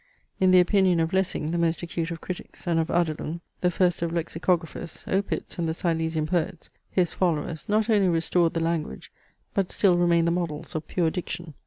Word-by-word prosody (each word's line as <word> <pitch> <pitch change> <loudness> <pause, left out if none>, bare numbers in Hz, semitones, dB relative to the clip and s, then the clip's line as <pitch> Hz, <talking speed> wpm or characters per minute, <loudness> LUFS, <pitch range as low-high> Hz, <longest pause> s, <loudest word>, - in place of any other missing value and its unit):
In 185 - +4
the 185 0 +7
opinion 185 -1 +4
of 165 +1 0
Lessing, 185 -5 0
the 170 - 0
most 170 0 +1
acute 170 -1 -3
of 165 -2 -6
critics, 185 - -7
and 170 -2 +2
of 160 - +1
Adelung, 170 -1 -1 0.2
the 180 - +2
first 180 0 +1
of 170 -1 -1
Lexicographers, 170 0 -2
Opitz, 195 -1 -2
and 165 -1 0
the 160 - -2
Silesian 160 -2 0
poets, 175 +1 -2 0.2
his 180 -3 +1
followers, 160 -3 -1
not 215 +1 +2
only 205 -4 +4
restored 170 +1 +2
the 165 - 0
language, 165 -1 -2 0.4
but 195 -2 0
still 180 -4 +3
remain 170 -1 +3
the 170 - +2
models 170 -4 -3
of 155 -1 -4
pure 170 -3 +1
diction. 170 -2 -5
170 Hz, 190 wpm, -26 LUFS, 165-180 Hz, 0.4 s, the